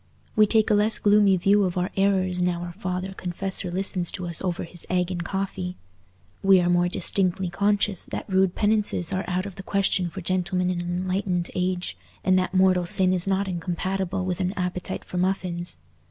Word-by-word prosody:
We 215 -1 +5
take 220 0 +3
a - - +5
less 210 +2 +3
gloomy 205 -2 +4
view 200 +3 +3
of 185 -1 -1
our 180 +1 -1
errors 190 -2 +1
now 175 -1 0
our 175 - -6
father 185 0 -4
confessor 185 0 -3
listens 185 -1 -1
to 185 - -4
us 170 -2 -3
over 180 -2 -2
his 175 0 -6
egg 180 0 0
and 175 -1 -3
coffee. 190 -1 -3 0.7
We 195 -1 +6
are 175 0 +2
more 175 0 +3
distinctly 185 0 +1
conscious 200 0 +1
that - - -5
rude 190 -1 +2
penances 205 -4 0
are 190 +1 -1
out 185 +1 -1
of 200 -2 -8
the - - -5
question 195 -2 0
for 190 +3 -7
gentlemen 180 0 0
in 175 -1 -2
an 175 - -5
enlightened 180 0 -1
age, 180 -1 -2 0.3
and 185 - +3
that 185 - -1
mortal 185 -2 +3
sin 185 +1 +4
is 180 0 0
not 195 +1 +1
incompatible 185 +2 -2
with 180 -1 -2
an 185 0 -1
appetite 180 -2 -4
for 180 - -4
muffins. 180 - -1
185 Hz, 195 wpm, -25 LUFS, 180-195 Hz, 0.7 s, We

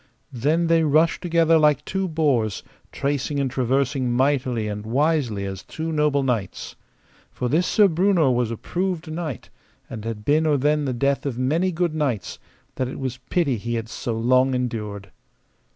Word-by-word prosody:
Then 150 +8 +1
they 165 0 +3
rushed 160 +2 +2
together 165 -2 +3
like 150 -1 +3
two 190 0 -2
boars, 140 - 0 0.3
tracing 140 +1 -2
and 135 -2 -1
traversing 130 0 0
mightily 125 -3 +1
and 105 0 -4
wisely 125 -4 0
as 95 -1 -5
two 160 +1 -5
noble 150 -2 +1
knights. 115 -8 -3 0.6
For 125 - -3
this 160 +8 +1
Sir 210 -2 +5
Breunor 175 -4 +3
was 120 -2 0
a 115 - -4
proved 180 - -3
knight, 155 -6 -5 0.4
and 110 - -6
had 110 -2 -5
been 155 +2 +3
or 150 -2 +3
then 150 +2 +1
the 130 - -1
death 140 +3 0
of 125 -4 -3
many 160 +9 +1
good 170 -1 -1
knights, 135 -11 -2 0.4
that 130 - 0
it 130 - -6
was 130 -1 -4
pity 165 -7 +1
that - - -10
he 120 +1 -2
had 115 -1 -4
so 115 -1 -4
long 130 +3 +3
endured. 105 -6 -4
140 Hz, 175 wpm, -23 LUFS, 120-160 Hz, 0.6 s, Sir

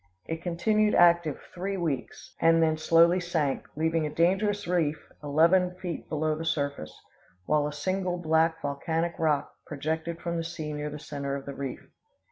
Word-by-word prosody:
It 165 0 -4
continued 210 +5 +1
active 170 -4 +4
three 195 +2 -3
weeks, 140 - -4
and 165 0 +5
then 160 -1 +2
slowly 165 +3 +4
sank, 165 -6 -1
leaving 160 +1 +1
a - - -4
dangerous 195 +6 +1
reef 165 -4 +1 0.3
eleven 170 +5 +3
feet 180 -2 -6
below 155 0 0
the 160 - -5
surface; 140 - -3 0.5
while 150 +3 +2
a - - -4
single 185 +4 -2
black 160 -1 +2
volcanic 160 +4 -1
rock 150 -3 +1
projected 160 +3 -3
from 170 -1 -3
the 165 - -1
sea 160 -2 -5
near 150 0 -3
the 150 - -7
center 140 -2 -4
of 140 - -6
the 140 - -6
reef. 135 -1 -6
160 Hz, 165 wpm, -28 LUFS, 150-175 Hz, 0.5 s, and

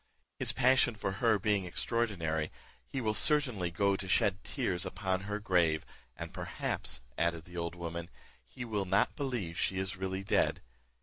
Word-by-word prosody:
His - - +3
passion 130 -2 +4
for 100 - -2
her 110 +2 +3
being 100 -1 +1
extraordinary, 85 -6 0 0.4
he 135 - -3
will 110 -2 +1
certainly 125 - +3
go 100 +3 +2
to 95 - -4
shed 95 +1 +2
tears 95 -10 -1
upon 95 -1 -1
her 105 0 -1
grave; 85 -7 +2 0.3
and - - -6
perhaps," - - -2 0.2
added 85 -1 0
the 90 0 -10
old 85 +1 -2
woman, 85 0 -5 0.4
'`he 125 - -6
will 105 -4 -1
not 95 +1 +2
believe 120 - -3
she 95 - +1
is 95 0 -2
really 95 0 -3
dead. - - +2
95 Hz, 165 wpm, -32 LUFS, 85-110 Hz, 0.4 s, passion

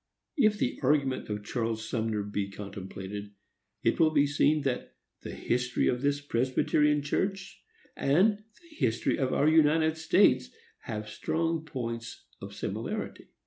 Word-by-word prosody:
If 215 -8 +3
the 125 - -1
argument 135 -3 +1
of 105 0 -3
Charles 115 -1 -2
Sumner 110 -3 -1
be 100 -1 -3
contemplated, 100 0 -7 0.5
it - - +2
will 160 -1 +6
be 145 -2 +3
seen 145 +1 +2
that 130 -3 -3 0.3
the - - -7
history 125 +1 0
of 125 - 0
this 145 0 +1
Presbyterian 145 +3 +1
Church 190 +6 -2 0.3
and 190 +10 +3 0.3
the 335 -2 -18
history 115 -1 0
of 130 -2 0
our 145 - +2
United 160 0 +4
States 160 -6 +3 0.4
have 105 -2 -4
strong 165 +8 -1
points 115 -5 -5 0.2
of - - -8
similarity. - - -4
135 Hz, 140 wpm, -29 LUFS, 115-155 Hz, 0.5 s, will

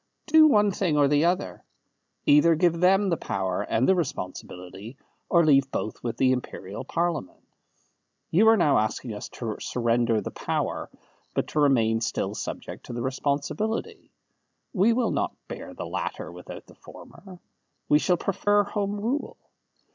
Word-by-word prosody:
Do 315 0 +7
one 210 -7 +4
thing 180 -5 0
or 145 -1 +5
the 145 +3 +3
other. 130 - -1 0.6
Either 150 +3 +5
give 170 0 +2
them 195 +3 +4
the 170 - +1
power 95 -2 -2
and 115 +4 0
the - - +6
responsibility, 100 - -5 0.3
or 170 -2 +4
leave 135 -3 +4
both 110 - -4
with 120 -2 -4
the 130 -1 +3
Imperial 105 -6 -4
Parliament. 165 - -3 0.9
You 210 +7 +4
are 225 0 +7
now 150 - +4
asking 110 +2 -2
us 105 - -7
to 110 -3 -5
surrender 115 -2 +1
the - - -5
power, - - -3 0.5
but - - -1
to 155 - -1
remain 115 -6 +3
still 110 - -2
subject - - -7
to - - -6
the 120 - -4
responsibility. 150 - -2 0.6
We 210 +2 +4
will 240 +1 +1
not - - -1
bear - - -8
the - - -6
latter - - -4
without - - -10
the - - -17
former. 190 -2 -14 0.5
We 150 - +5
shall 180 +2 +2
prefer 205 +3 +1
Home 205 0 -3
Rule." 250 +8 -3
150 Hz, 155 wpm, -26 LUFS, 120-195 Hz, 0.9 s, Do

